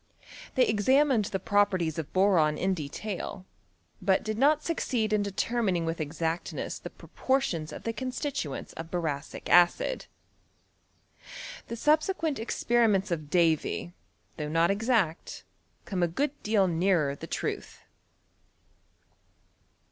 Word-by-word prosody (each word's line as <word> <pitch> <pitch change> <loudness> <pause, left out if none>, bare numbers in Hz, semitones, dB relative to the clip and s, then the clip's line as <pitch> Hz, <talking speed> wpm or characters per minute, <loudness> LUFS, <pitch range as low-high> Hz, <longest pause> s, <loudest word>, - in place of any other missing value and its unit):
Tliey 255 - +5
examined 255 +2 +3
the 190 - -3
properties 185 -5 +1
of 155 - -5
boron 180 -6 +3
in 190 +1 +1
detail, 185 +4 -5 0.6
but 190 0 +2
did 215 0 -2
not 295 +6 +3
succeed 240 -9 -1
in 210 - +3
determining 200 -3 0
with 165 0 -2
exactness 160 +2 -3
the - - -7
proportions 230 - -2
of - - -8
the 230 - -2
constituents 260 - -4
of 165 0 -7
boracic 160 -4 -3
acid. 175 - +3 1.6
The 230 - -4
subsequent 310 - +1
experiments 225 -4 +1
of 155 -4 -3
Davy, 170 0 +1 0.4
though 150 -2 -3
not 165 +3 +3
exact, 210 -6 0 0.4
C(»ne 185 -4 -1
a - - +4
good 280 - 0
deal 210 -3 +2
nearer 170 -4 +2
the - - -9
truth. - - -4
195 Hz, 120 wpm, -28 LUFS, 165-235 Hz, 1.6 s, Tliey